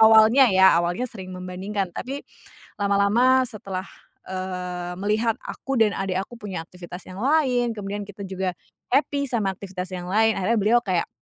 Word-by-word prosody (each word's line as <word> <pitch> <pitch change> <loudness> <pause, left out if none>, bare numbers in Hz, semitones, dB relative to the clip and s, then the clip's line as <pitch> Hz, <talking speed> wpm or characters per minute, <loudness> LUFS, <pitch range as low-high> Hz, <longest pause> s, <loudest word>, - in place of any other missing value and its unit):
awalnya 220 +4 +7
ya, 190 -2 +6
awalnya 175 +8 -1
sering 190 -4 -9
membandingkan, 185 +2 -4
tapi 270 +8 -5 0.6
lama-lama 215 +6 +4
setelah, 195 -4 -5 0.4
eee, 180 -1 -4
melihat 220 +3 +1
aku 270 -2 -3
dan 215 -2 +3
adik 190 -1 -1
aku 235 +5 -8
punya 195 -5 -4
aktivitas 180 +1 -10
yang 185 - -9
lain, 255 -5 +2
kemudian 205 0 -4
kita 205 0 -13
juga 190 -1 -2 0.4
happy 280 +1 +2
sama 205 -5 0
aktivitas 185 -1 -6
yang 180 0 -5
lain, 220 +2 +4
akhirnya 220 +5 +1
beliau 220 +4 +4
kayak, 185 -3 0
200 Hz, 155 wpm, -24 LUFS, 185-230 Hz, 0.6 s, awalnya